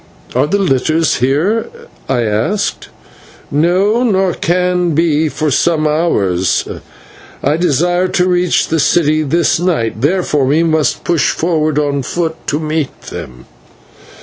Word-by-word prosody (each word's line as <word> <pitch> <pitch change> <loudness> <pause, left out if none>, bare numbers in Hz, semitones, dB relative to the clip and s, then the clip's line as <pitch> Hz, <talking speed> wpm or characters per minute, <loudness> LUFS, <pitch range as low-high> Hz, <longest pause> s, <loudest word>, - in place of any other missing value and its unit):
"Are - - +1
the 200 - +1
litters 160 -2 +1
here?" 150 - 0 0.4
I 130 -3 +1
asked. 115 - -2 0.6
"No, 185 - +2
nor 190 -7 +1
can 180 -1 0
be 160 -1 +2
for 155 0 -2
some 155 +1 +1
hours. 100 - 0 0.8
I 145 +2 +2
desire 175 +2 +1
to 185 0 +1
reach 180 -1 +1
the 160 - 0
city 155 0 +2
this 160 +2 +1
night, 150 -12 -1
therefore 150 -2 +1
we 150 +5 +2
must 160 -2 0
push 170 -5 +1
forward 155 -3 0
on 145 -2 0
foot 160 +4 -2
to 150 - 0
meet 155 -2 -3
them." 60 0 -9
160 Hz, 130 wpm, -14 LUFS, 145-175 Hz, 0.8 s, No